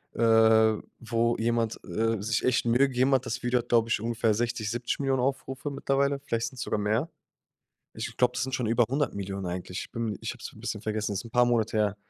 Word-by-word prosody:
äh, 110 -1 +5 0.2
wo 115 0 0
jemand, 115 0 0
äh, 110 +3 -1
sich 110 +2 0
echt 125 -1 +2
Mühe 125 +4 +4
gegeben 130 +2 +2
hat, 130 -1 +2
das 120 +2 -3
Video 125 0 +1
hat, 120 - -7
glaube 115 -1 +4
ich, 115 - 0
ungefähr 115 -1 +1
60.000.000, 115 -1 -1
70.000.000 125 +2 -1
Aufrufe 135 +1 -2
mittlerweile, 140 0 0
vielleicht 115 0 -1
sind's 130 - -8
sogar 105 - -1
mehr. 110 +10 0 0.9
Ich - - -6
glaube, 125 -1 +3
das 125 - 0
sind 130 -1 -4
schon 125 -4 -1
über 115 +1 +4
100.000.000 100 -9 -2
eigentlich. 90 +1 -4
Ich - - -39
bin 115 -2 -2
m - - -4
ich - - -3
habe - - -14
es - - -7
'n - - -14
bisschen - - -4
vergessen, 105 -1 -2
ist 100 - -3
'n 115 - -10
paar 125 +1 +4
Monate 115 -2 +1
her. 105 -1 +1
115 Hz, 225 wpm, -28 LUFS, 110-125 Hz, 0.9 s, äh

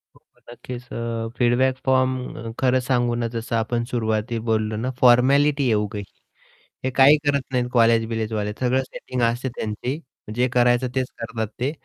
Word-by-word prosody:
हो, - - -22
हो, - - -28
नक्कीच 120 +1 -8
अ, 115 -1 -3
फीडबॅक 125 +2 +2
फॉर्म 130 -3 0
खरं 130 0 +3
सांगू 120 -2 0
ना, 120 -1 -1
जसं 115 0 -4
आपण 115 +1 0
सुरुवाती 110 0 -1
बोललो 110 -1 0
ना, 120 +4 -2
फॉर्मॅलिटी 140 +4 +5
आहे 120 -4 +2
उग 105 +1 -6
ही. 100 - -4 0.8
हे 130 - 0
काही 135 +4 +6
करत 140 -1 +2
नाहीत 125 -1 0
कॉलेज-बिलेजवाले. 115 -2 +1
सगळं 130 +1 +2
सेटिंग 130 -1 -6
असते 120 +3 0
त्यांची, 120 +7 -3 0.4
जे 125 +1 +2
करायचं 120 +1 +3
तेच 130 -1 0
करतात 115 -1 -3
ते. 135 +4 0
120 Hz, 160 wpm, -23 LUFS, 115-130 Hz, 0.8 s, काही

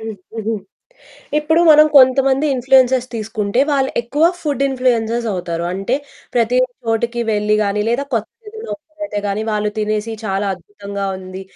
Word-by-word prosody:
హ్మ్. 220 0 -6 0.2
హుహు. 225 0 -2 0.9
ఇప్పుడు 320 +3 +2
మనం 305 0 +7
కొంతమంది 270 +2 +4
ఇన్‌ఫ్లూయెన్సర్స్ 255 0 +3
తీసుకుంటే, 215 +1 -1
వాళ్ళు 270 -2 +1
ఎక్కువ 285 +7 +1 0.2
ఫుడ్ 285 -3 -1
ఇన్‌ఫ్లూయెన్సర్స్ 240 -3 0
అవుతారు. 170 -2 -3
అంటే, 195 +7 -1 0.4
ప్రతి 240 +1 +2 0.3
చోటికి 235 +1 -1
వెళ్లి 210 0 +1
కానీ, 205 +1 0
లేదా 245 +4 0
కొత్తదేదైనా 440 - -5
ఓపెన్ 310 0 -22
అయితే 210 -9 -3
గానీ 200 +2 -2
వాళ్ళు 210 0 0
తినేసి, 215 +1 -1
చాలా 195 0 -1
అద్భుతంగా 200 +2 -7
ఉంది, 185 0 -8
230 Hz, 140 wpm, -18 LUFS, 210-265 Hz, 0.9 s, మనం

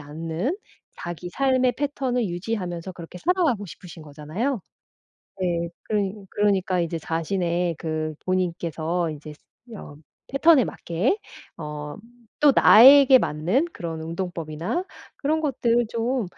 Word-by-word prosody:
않는 165 - -3 0.4
자기 175 +1 -6
삶의 260 0 +2
패턴을 265 -4 -1
유지하면서 175 -1 -4
그렇게 175 0 -10
살아가고 320 - +1
싶으신 175 -1 -11
거잖아요. 155 - -3 0.8
네. 170 -2 0
그러니 205 -2 -1 0.2
그러니까 195 -3 +1
이제 165 0 -2
자신의 170 +1 -1
그 155 -1 -3
본인께서 170 -2 -1
이제 150 0 -9 0.4
어 145 - -10 0.3
패턴에 275 -1 +5
맞게 190 - -1 0.4
어 150 -1 -6 0.5
또 290 -2 +7
나에게 265 +3 +9
맞는 180 - 0
그런 165 -2 -5
운동법이나 165 - -4 0.3
그런 310 +2 0
것들 240 -5 +1
좀 235 +1 -1
180 Hz, 265 characters per minute, -24 LUFS, 165-250 Hz, 0.8 s, 나에게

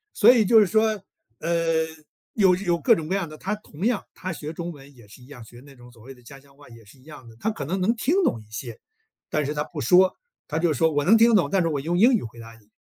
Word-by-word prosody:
所 225 +3 +6
以 235 -3 +3
就 225 +3 +6
是 210 - +4
说， 215 +1 +1 0.4
呃， 165 -1 0 0.5
有 190 -4 +4
有 175 -3 -1
各 235 - +4
种 160 -5 -6
各 185 - -1
样 190 -5 -3
的， 155 - -11
他 210 - -3
同 195 -4 -8
样， 235 -3 0
他 185 -1 -6
学 150 -1 -7
中 170 +1 -6
文 140 -1 -16
也 120 -4 -18
是 110 +5 -16
一 - - -17
样， 135 -5 -12
学 120 +2 -15
那 140 - -15
种 120 -1 -16
所 115 -2 -19
谓 135 +3 -11
的 125 - -21
家 135 +3 -13
乡 140 0 -24
话 145 -1 -17
也 115 -1 -15
是 105 +6 -19
一 - - -22
样 145 -4 -13
的， 115 - -17
他 220 - -1
可 165 -9 -7
能 185 +7 -3
能 210 +6 +1
听 255 +7 -1
懂 115 - -1
一 110 0 -21
些， 115 +1 -7 0.5
但 150 -1 -1
是 145 - -3
他 150 0 -2
不 155 0 -9
说， 180 +8 +4 0.3
他 155 - -2
就 165 -1 +1
说 160 +2 +1
“我 145 -1 -1
能 220 +6 +6
听 230 +1 +5
懂， 170 -8 +2
但 190 +4 +1
是 165 - 0
我 145 -3 -2
用 165 +5 -2
英 235 +7 +5
语 220 - -2
回 115 +1 -10
答 115 0 -12
你”， 105 - -28
160 Hz, 315 characters per minute, -23 LUFS, 135-190 Hz, 0.5 s, 所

